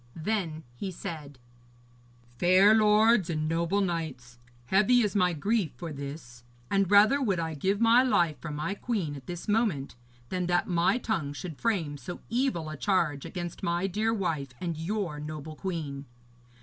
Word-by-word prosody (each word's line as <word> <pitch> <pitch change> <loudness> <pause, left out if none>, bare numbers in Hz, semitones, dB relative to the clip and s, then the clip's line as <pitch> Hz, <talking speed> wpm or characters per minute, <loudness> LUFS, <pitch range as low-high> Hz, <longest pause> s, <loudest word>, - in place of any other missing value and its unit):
Then 165 -3 -2
he 155 +11 -5
said: 155 -6 -7 1.0
'Fair 185 +4 +6
lords 215 -2 +4
and 155 -2 -1
noble 170 +5 +1
knights, 150 -9 -4 0.3
heavy 210 - +4
is 210 -2 0
my 180 -3 +3
grief 190 +2 0
for 170 -3 -6
this, 140 -3 -8 0.3
and 195 -2 +2
rather 210 +7 +6
would 200 -9 +1
I 160 -1 -2
give 190 +7 0
my 230 +2 +6
life 175 - +2
for 165 - -6
my 150 +5 -3
queen 200 -8 -2
at 135 -2 -11
this 175 -1 -6
moment 205 - 0 0.3
than 180 -1 -2
that 175 0 +1
my 175 +5 +2
tongue 165 - -2
should 160 0 -8
frame 175 -11 0
so 175 +5 -7
evil 235 - 0
a 155 - -7
charge 160 -6 0
against 175 -3 -6
my 170 +2 0
dear 210 +4 0
wife 155 - -2
and 170 -2 -3
your 170 -1 -3
noble 155 +1 -7
queen. 150 -7 -4
175 Hz, 160 wpm, -28 LUFS, 155-205 Hz, 1.0 s, Fair